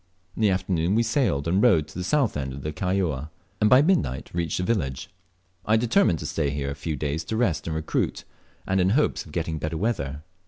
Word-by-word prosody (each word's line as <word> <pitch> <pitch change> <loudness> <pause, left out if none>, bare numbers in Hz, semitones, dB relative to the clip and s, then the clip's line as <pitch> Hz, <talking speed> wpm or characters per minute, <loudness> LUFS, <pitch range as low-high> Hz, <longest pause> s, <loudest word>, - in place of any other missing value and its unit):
In - - -5
the 105 - +5
afternoon 90 -1 0
we 115 - +3
sailed 110 - 0
and 95 +4 +2
rowed 95 -11 +4
to - - -13
the 90 - -3
south 135 +3 +1
end 70 -2 -3
of 70 0 -8
Kaióa, 80 -5 -1 0.3
and 105 - +5
by 130 +4 +7
midnight 155 - 0
reached 85 -1 -1
the 90 - -1
village. 90 - -2 0.5
I 110 +1 +3
determined 120 - +3
to - - -7
stay 70 - -1
here 70 -1 -3
a - - -2
few 75 +2 -4
days 75 +3 -2
to 110 - -2
rest 85 -12 0
and 80 - -2
recruit, 80 0 -1 0.4
and 95 0 +1
in 90 - +3
hopes 150 - 0
of - - -13
getting 80 -1 -2
better 80 +1 -3
weather. 75 - -2
85 Hz, 220 wpm, -25 LUFS, 75-105 Hz, 0.5 s, by